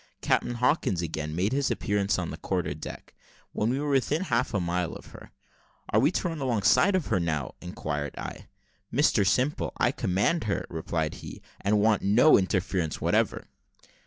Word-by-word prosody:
Captain 120 - +1
Hawkins 120 - +1
again 75 -1 -4
made 95 +5 0
his 140 +1 +1
appearance 100 -1 0
on 90 -3 -3
the - - -6
quarter 90 -6 -2
deck, 75 +1 -9 0.4
when 105 - 0
we 130 +3 0
were 145 0 -1
within 140 +5 +1
half - - 0
a 105 - 0
mile 90 0 -1
of - - -10
her. - - -12 0.6
"Are 105 - +3
we 135 +6 +4
to 180 - 0
run 165 -2 -4
alongside 130 - +3
of 185 - 0
her, - - +1
or 85 - -1
how?" 75 -5 -2
inquired 75 -5 -4
I. - - -7 0.4
"Mr 120 -7 +3
Simple, 130 +8 +1
I - - +2
command 100 - 0
her," 100 - -1
replied 80 -1 -2
he, - - -9 0.2
"and 105 +1 +2
want 105 0 +3
no 115 +10 +5
interference 90 -4 0
whatever." - - +1
100 Hz, 180 wpm, -27 LUFS, 85-130 Hz, 0.6 s, no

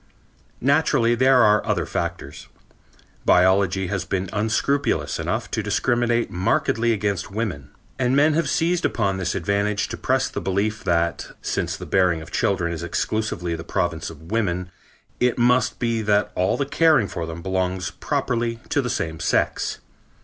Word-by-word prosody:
Naturally 135 -4 +3
there 130 +1 +5
are 105 0 +4
other - - 0
factors. 85 -4 -5 0.8
Biology 95 +1 +3
has 95 0 -2
been 95 0 -3
unscrupulous 110 +7 0
enough - - -2
to - - -1
discriminate 120 -1 +1
markedly 115 +5 +1
against 100 -4 -1
women, 95 -10 -4 0.3
and 125 0 +2
men 150 +2 +4
have 160 -2 0
seized 170 +3 +1
upon 100 -5 0
this 90 -2 -2
advantage 100 +3 0
to - - -5
press - - +1
the - - -5
belief 105 +3 -1
that, 85 -1 0 0.2
since - - -2
the - - -8
bearing 90 -3 +2
of 80 +1 -11
children 85 -4 0
is 80 - -5
exclusively 85 +1 -2
the 80 0 -5
province 85 -2 -2
of 80 +2 -12
women, 90 -5 -1 0.5
it 125 -1 +2
must 125 +1 +2
be 115 -2 0
that 105 -1 +1
all 90 +1 +1
the 140 - 0
caring 150 -6 +3
for 85 -3 -5
them 80 +1 -7
belongs 95 -1 -1
properly 115 -1 -2
to 145 - +2
the 125 - -3
same 80 -6 -3
sex. 85 - 0
100 Hz, 155 wpm, -23 LUFS, 90-120 Hz, 0.8 s, there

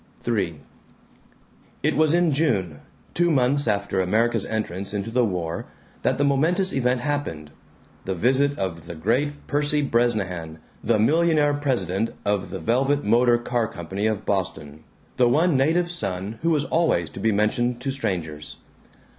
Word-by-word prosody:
III 95 -10 -1 1.2
It - - +2
was 155 +2 +3
in 175 -2 +3
June, 100 - 0 0.3
two 175 0 +2
months 140 -2 +2
after 100 -2 0
America's 110 +4 +1
entrance 100 -2 -3
into 105 +3 -3
the 125 +1 +2
war, 85 -6 -3 0.3
that - - +1
the 145 - +1
momentous 165 +7 +2
event 125 -1 +1
happened 120 - -3 0.5
the 95 - -2
visit 135 +8 +2
of 85 -4 -4
the 85 - -7
great 130 - -1
Percy 145 0 0
Bresnahan, 100 - -1 0.3
the 115 0 +2
millionaire 150 +5 +3
president 125 -8 -1
of 100 -2 0
the 95 - -5
Velvet 135 - +1
Motor 120 +3 +4
Car 120 -1 -1
Company 95 +4 -3
of 110 -1 -2
Boston, 80 -6 -3 0.3
the 125 -1 +4
one 160 +5 +3
native 165 +6 +2
son 100 - -3
who 165 - +1
was 150 -3 +1
always 160 - +1
to - - -9
be 110 +3 +2
mentioned 120 +4 +1
to 135 +1 -2
strangers. 80 - -4
120 Hz, 150 wpm, -24 LUFS, 95-145 Hz, 1.2 s, Motor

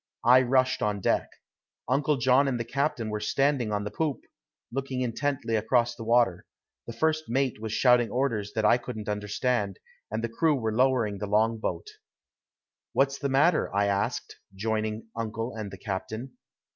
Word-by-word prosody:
I 125 +2 +7
rushed 130 0 +2
on 105 -1 0
deck. - - +1 0.6
Uncle 140 +3 +2
John 130 +3 +4
and 125 -3 -1
the - - -1
captain 130 -4 -1
were 105 - -2
standing 130 +1 +1
on 105 0 -1
the 105 - -5
poop, 155 -4 -2 0.5
looking 130 0 -3
intently 130 0 -1
across 120 +2 +1
the 115 - -8
water; 115 -6 +2 0.4
the - - -4
first 155 +5 0
mate 130 -2 0
was 110 -1 -4
shouting 125 0 +4
orders 115 -6 -1
that 110 -1 +1
I 120 +3 +5
couldn't 120 -4 -7
understand, 105 0 -1 0.3
and 110 +2 -3
the - - +1
crew 155 +6 +2
were 110 -4 -2
lowering 120 -5 +2
the 105 - -3
long 110 +2 +2
boat. - - -3 1.1
"What's 140 0 +2
the 140 - -1
matter?" 150 +5 +3
I 100 0 +3
asked, 100 0 -2 0.2
joining 110 +1 -2
uncle 115 +1 -3
and 110 -2 -5
the 95 - -9
captain. 110 +6 -5
115 Hz, 170 wpm, -27 LUFS, 110-130 Hz, 1.1 s, I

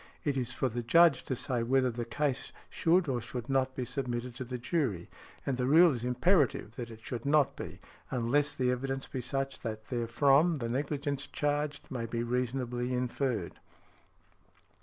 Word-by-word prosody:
It 145 -2 0
is 125 -2 -1
for 125 +2 0
the 120 0 -3
Judge 160 +3 +5
to 130 - -1
say 125 -1 -1
whether 130 +1 +2
the 120 0 -4
case 135 +2 -1 0.2
should 170 +1 +3
or 125 -3 0
should 120 0 -6
not 130 -1 +1
be 125 - -2
submitted 125 -1 -3
to 130 - -3
the 125 0 -5
jury; 120 - -1 0.3
and 135 -2 -1
the 125 0 0
rule 165 +3 +7
is 120 -2 -4
imperative 125 - +2
that 120 -2 -5
it 110 -1 -11
should 120 -2 -5
not 145 0 +3
be, - - -7 0.3
unless 135 +4 +1
the 125 -1 +1
evidence 135 +1 -2
be 130 - -4
such 135 +2 -2
that 110 -1 -5
therefrom 135 +7 +3
the 120 -5 -3
negligence 140 +2 -2
charged 145 0 -2
may 120 -3 -3
be 115 +1 -2
reasonably 125 0 -1
inferred. 125 -5 -2
130 Hz, 175 wpm, -31 LUFS, 120-140 Hz, 0.3 s, rule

